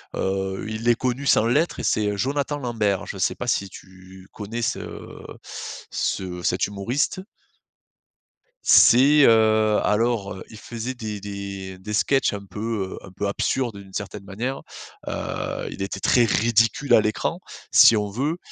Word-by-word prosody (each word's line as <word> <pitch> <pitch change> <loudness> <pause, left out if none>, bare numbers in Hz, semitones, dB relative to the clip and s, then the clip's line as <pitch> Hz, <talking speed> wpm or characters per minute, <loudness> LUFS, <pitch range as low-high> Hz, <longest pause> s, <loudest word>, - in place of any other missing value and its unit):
Heu, 95 0 -2
il 110 +2 -2
est 120 - +5
connu 130 +3 -2
sans 110 - +4
l'être 145 +9 +1
et - - -4
c'est 105 -1 0
Jonathan 140 +5 -1
Lambert. 110 -7 -1
Je - - -7
sais - - +1
pas - - -5
si 100 - 0
tu 95 0 -14
connais 115 +3 -5
ce - - -1 1.1
ce 90 -2 -2
cet 90 +1 +1
humoriste? 120 - -2 1.4
C'est, 140 +4 +6
heu, 110 -1 +4
alors, 105 -2 +1
heu, 95 - -9
il 110 - -11
faisait 120 +3 -5
des 110 -4 -6
des 100 -2 -6
des 105 +3 -7
sketchs 135 +4 +2
un 100 -1 -6
peu, 105 -1 -4
heu, - - -12
un 95 - -12
peu 100 +2 -3
absurdes 115 +2 -1
d'une 95 -1 -13
certaine 105 0 -5
manière. 120 +8 -4 0.5
Heu, - - -4
il - - -8
était 95 0 -3
très 120 +3 +4
ridicule 115 +6 +2
à - - +7
l'écran, 105 0 -1 0.3
si 115 - +8
on 105 -1 -1
veut. 140 - -2
110 Hz, 160 wpm, -23 LUFS, 100-120 Hz, 1.4 s, si